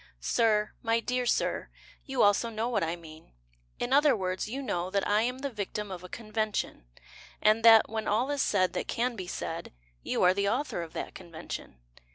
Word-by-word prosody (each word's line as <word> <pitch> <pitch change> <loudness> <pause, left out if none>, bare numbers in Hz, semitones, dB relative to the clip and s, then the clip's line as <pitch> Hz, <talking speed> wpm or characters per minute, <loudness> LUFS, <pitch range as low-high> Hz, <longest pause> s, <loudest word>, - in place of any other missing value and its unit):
Sir, 210 - +2
My 230 0 +2
dear 250 +1 -1
Sir, - - 0 0.4
You 270 -2 +2
also 205 +3 +3
know 225 +1 -2
what 215 -7 0
I 165 +1 -1
mean; 160 - -14 0.5
In 245 +2 -1
other 290 -1 +5
words, 185 0 -2
you 270 +4 -4
know 180 -7 -2
That 200 0 0
I 210 +1 +3
am 250 +2 -1
the 280 +1 -3
victim 210 -1 -4
of 180 -1 -7
a 180 - -9
convention, 215 - -3 0.5
And 215 +1 +3
that, 225 -1 +8
when 220 0 -4
all 245 +7 +1
is 285 -1 0
said 185 -3 +2
that - - -3
can 240 +1 -1
be 185 -4 -6
said, 165 -1 -5 0.3
You - - -1
are 180 0 +6
the 200 +1 +1
author 250 -4 -1
of 165 -1 -8
that - - -5
convention. 160 - -8
215 Hz, 200 wpm, -29 LUFS, 185-235 Hz, 0.5 s, that